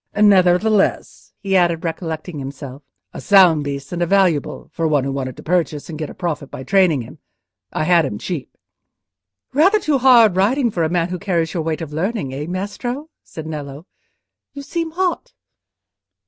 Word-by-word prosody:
"Nevertheless," 195 Hz, +1 st, +2 dB
he 195 Hz, -1 st, -1 dB
added, 170 Hz, -3 st, +2 dB
recollecting 160 Hz, -1 st, -5 dB
himself, 135 Hz, 0 st, -8 dB, 0.3 s
"a -, -, -7 dB
sound 180 Hz, -7 st, +5 dB
beast 140 Hz, -1 st, -5 dB
and 175 Hz, -1 st, -3 dB
a 175 Hz, -, +1 dB
valuable, 185 Hz, -6 st, +1 dB
for 165 Hz, -1 st, -1 dB
one 145 Hz, -3 st, +2 dB
who 135 Hz, -, -2 dB
wanted 130 Hz, -2 st, -4 dB
to -, -, -11 dB
purchase, 165 Hz, -3 st, -1 dB
and 155 Hz, -, -7 dB
get 155 Hz, -, -4 dB
a -, -, -11 dB
profit 165 Hz, -6 st, -4 dB
by 130 Hz, -, -8 dB
training 175 Hz, -4 st, +2 dB
him. -, -, -13 dB, 0.5 s
I -, -, -2 dB
had 170 Hz, 0 st, +4 dB
him 120 Hz, -8 st, -3 dB
cheap." 160 Hz, -, -5 dB, 1.0 s
"Rather 375 Hz, +10 st, +4 dB
too 300 Hz, -8 st, 0 dB
hard 235 Hz, -6 st, +6 dB
riding 235 Hz, +6 st, +2 dB
for 175 Hz, -, -2 dB
a 160 Hz, -, +1 dB
man 170 Hz, 0 st, 0 dB
who 180 Hz, 0 st, -4 dB
carries 170 Hz, -3 st, -1 dB
your 170 Hz, -, -1 dB
weight 160 Hz, +1 st, -3 dB
of 155 Hz, -2 st, -7 dB
learning: 165 Hz, -, -2 dB
eh, 145 Hz, +3 st, -5 dB
Maestro?" 240 Hz, -, -5 dB
said 160 Hz, -, -9 dB
Nello. 150 Hz, -1 st, -7 dB, 0.7 s
"You 280 Hz, -, -8 dB
seem 330 Hz, +2 st, -3 dB
hot." 360 Hz, +1 st, -2 dB
175 Hz, 175 wpm, -19 LUFS, 150-200 Hz, 1.0 s, hard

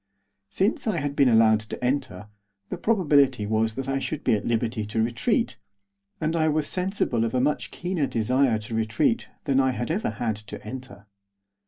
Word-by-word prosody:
Since 200 Hz, -, 0 dB
I 210 Hz, -5 st, +1 dB
had 145 Hz, -2 st, -2 dB
been 140 Hz, -3 st, +4 dB
allowed 110 Hz, -1 st, +5 dB
to 110 Hz, +3 st, -7 dB
enter, 105 Hz, -7 st, -1 dB, 0.4 s
the -, -, -4 dB
probability 145 Hz, -, +3 dB
was 110 Hz, +1 st, 0 dB
that 135 Hz, 0 st, -4 dB
I 135 Hz, 0 st, 0 dB
should 150 Hz, +2 st, -4 dB
be -, -, +3 dB
at 105 Hz, -1 st, -1 dB
liberty 115 Hz, -1 st, 0 dB
to 105 Hz, +2 st, -3 dB
retreat, 130 Hz, -, 0 dB, 0.6 s
and 160 Hz, +1 st, -1 dB
I 160 Hz, -1 st, +2 dB
was 155 Hz, -1 st, +1 dB
sensible 180 Hz, -, 0 dB
of 115 Hz, +2 st, -1 dB
a -, -, +3 dB
much 125 Hz, -2 st, 0 dB
keener 175 Hz, -5 st, -2 dB
desire 125 Hz, +1 st, +2 dB
to 110 Hz, +1 st, -8 dB
retreat 110 Hz, -, 0 dB
than 135 Hz, -1 st, +2 dB
I 130 Hz, -1 st, +2 dB
had 120 Hz, +3 st, -3 dB
ever 200 Hz, +6 st, 0 dB
had 110 Hz, 0 st, -2 dB
to 105 Hz, -1 st, -8 dB
enter. 110 Hz, -4 st, -8 dB
125 Hz, 185 wpm, -25 LUFS, 110-150 Hz, 0.6 s, allowed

